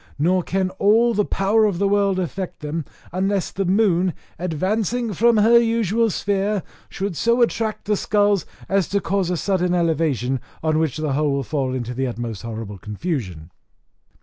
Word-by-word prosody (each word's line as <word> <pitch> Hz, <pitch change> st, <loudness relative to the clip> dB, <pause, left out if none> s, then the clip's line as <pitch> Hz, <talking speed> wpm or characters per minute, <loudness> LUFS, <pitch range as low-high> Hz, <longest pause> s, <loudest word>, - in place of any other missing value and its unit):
Nor 180 Hz, +5 st, +2 dB
can 185 Hz, +1 st, -1 dB
all 230 Hz, +4 st, +4 dB
the 210 Hz, -1 st, +2 dB
power 205 Hz, +3 st, +2 dB
of 200 Hz, -5 st, 0 dB
the 200 Hz, +2 st, +1 dB
world 200 Hz, -1 st, +2 dB
affect 185 Hz, +1 st, -4 dB
them, 150 Hz, +1 st, -3 dB, 0.3 s
unless 190 Hz, +1 st, -1 dB
the 195 Hz, -, -2 dB
moon, 185 Hz, -2 st, +2 dB, 0.2 s
advancing 210 Hz, +7 st, -1 dB
from 230 Hz, +5 st, +3 dB
her 230 Hz, +3 st, +6 dB
usual 230 Hz, -1 st, +1 dB
sphere, 200 Hz, 0 st, -1 dB, 0.3 s
should 195 Hz, -2 st, -4 dB
so 235 Hz, +8 st, +2 dB
much 240 Hz, -2 st, +3 dB
attract 220 Hz, -2 st, -3 dB
the 210 Hz, 0 st, +1 dB
skulls 205 Hz, -2 st, +1 dB, 0.2 s
as 195 Hz, -3 st, +1 dB
to 200 Hz, -, 0 dB
cause 195 Hz, -2 st, -1 dB
a 180 Hz, -, 0 dB
sudden 180 Hz, -1 st, 0 dB
elevation, 155 Hz, -7 st, 0 dB, 0.2 s
on 155 Hz, -1 st, +2 dB
which 160 Hz, -4 st, 0 dB
the 155 Hz, -3 st, -1 dB
whole 145 Hz, 0 st, +1 dB
will 140 Hz, 0 st, -1 dB
fall 130 Hz, -1 st, -2 dB
into 125 Hz, -1 st, -4 dB
the 130 Hz, 0 st, -1 dB
most 115 Hz, -4 st, -5 dB
horrible 110 Hz, -3 st, -6 dB
confusion." 105 Hz, -, -4 dB
185 Hz, 175 wpm, -22 LUFS, 150-205 Hz, 0.3 s, her